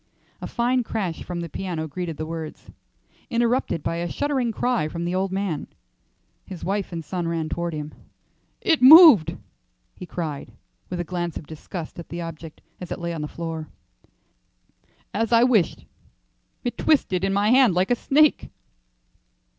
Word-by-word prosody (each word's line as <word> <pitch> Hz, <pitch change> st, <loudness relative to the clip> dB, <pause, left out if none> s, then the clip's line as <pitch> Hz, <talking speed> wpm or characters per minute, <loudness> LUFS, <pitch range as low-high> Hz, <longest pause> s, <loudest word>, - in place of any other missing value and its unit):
A -, -, -4 dB
fine 250 Hz, +1 st, +1 dB
crash 195 Hz, -8 st, -3 dB
from 175 Hz, -1 st, -5 dB
the 170 Hz, -, -4 dB
piano 165 Hz, -2 st, -4 dB
greeted 165 Hz, 0 st, -5 dB
the 155 Hz, -, -4 dB
words, 160 Hz, -1 st, -7 dB, 0.6 s
interrupted 235 Hz, -6 st, 0 dB
by 165 Hz, -, -2 dB
a 170 Hz, 0 st, -3 dB
shuddering 275 Hz, -5 st, -1 dB
cry 220 Hz, -8 st, 0 dB
from 170 Hz, +2 st, -5 dB
the 175 Hz, -, -2 dB
old 190 Hz, +1 st, -1 dB
man. 190 Hz, -5 st, -2 dB, 0.8 s
His 185 Hz, -3 st, -9 dB
wife 200 Hz, 0 st, -2 dB
and 165 Hz, -2 st, -5 dB
son 175 Hz, +1 st, -3 dB
ran 165 Hz, -2 st, -2 dB
toward 170 Hz, -1 st, -3 dB
him. 150 Hz, 0 st, -6 dB, 0.7 s
"It 325 Hz, -8 st, +2 dB
moved," 290 Hz, -, +9 dB, 0.6 s
he 180 Hz, -, -9 dB
cried, 155 Hz, -6 st, -5 dB, 0.4 s
with 180 Hz, -, -4 dB
a -, -, 0 dB
glance 175 Hz, -1 st, -4 dB
of -, -, -8 dB
disgust 160 Hz, +2 st, -8 dB
at 170 Hz, -, -9 dB
the 170 Hz, +1 st, -5 dB
object 165 Hz, -1 st, -8 dB, 0.2 s
as 180 Hz, -, -8 dB
it -, -, -3 dB
lay 170 Hz, -1 st, -4 dB
on 160 Hz, -, -4 dB
the 150 Hz, -, -3 dB
floor. 165 Hz, -1 st, -6 dB, 1.5 s
"As 225 Hz, +2 st, -1 dB
I 230 Hz, 0 st, +6 dB
wished, 230 Hz, -8 st, +2 dB, 0.8 s
it 245 Hz, -, -4 dB
twisted 205 Hz, -, +2 dB
in 195 Hz, -, +1 dB
my 205 Hz, +3 st, +2 dB
hand 250 Hz, -7 st, +5 dB
like 185 Hz, +5 st, +1 dB
a -, -, +5 dB
snake." 295 Hz, +5 st, +2 dB
180 Hz, 165 wpm, -24 LUFS, 165-230 Hz, 1.5 s, moved